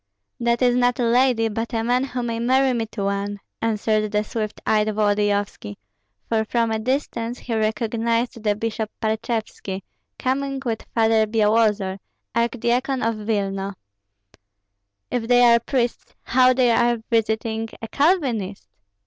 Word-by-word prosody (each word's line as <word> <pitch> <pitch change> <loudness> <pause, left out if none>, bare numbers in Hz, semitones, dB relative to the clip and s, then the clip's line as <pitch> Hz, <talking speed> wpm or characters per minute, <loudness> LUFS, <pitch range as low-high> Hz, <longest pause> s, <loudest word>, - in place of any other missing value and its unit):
"That 235 +1 +1
is 245 -1 +4
not 245 0 +2
a - - +2
lady, 240 -1 +3
but 225 +2 -3
a 225 - 0
man 250 +3 +1
who 255 -2 -4
may 230 -1 -2
marry 260 +2 +3
me 230 -2 -1
to 210 -2 -5
one," 200 +1 -2 0.2
answered 215 -1 0
the 210 0 +1
swift 215 -1 -4
eyed 215 0 +2
Volodyovski; 205 - 0 0.5
for 220 -1 +1
from 230 +1 0
a 220 - 0
distance 245 -1 -2
he 240 - -5
recognized 230 +1 0
the 210 -1 +1
bishop 220 0 -3
Parchevski, 220 -3 -3 0.3
coming 275 +1 -1
with 225 -2 -3
Father 225 -1 +3
Byalozor, 210 -3 +2 0.3
archdeacon 245 +3 0
of 230 +1 +1
Vilna. 200 -2 -2 1.4
"If 235 -2 -1
they 245 0 +5
are 235 -1 +6
priests, 240 0 -2
how 255 +1 +3
are 255 - +6
they 240 -1 +3
visiting 225 0 0
a 225 - -6
Calvinist?" 250 - 0
225 Hz, 140 wpm, -22 LUFS, 215-245 Hz, 1.4 s, are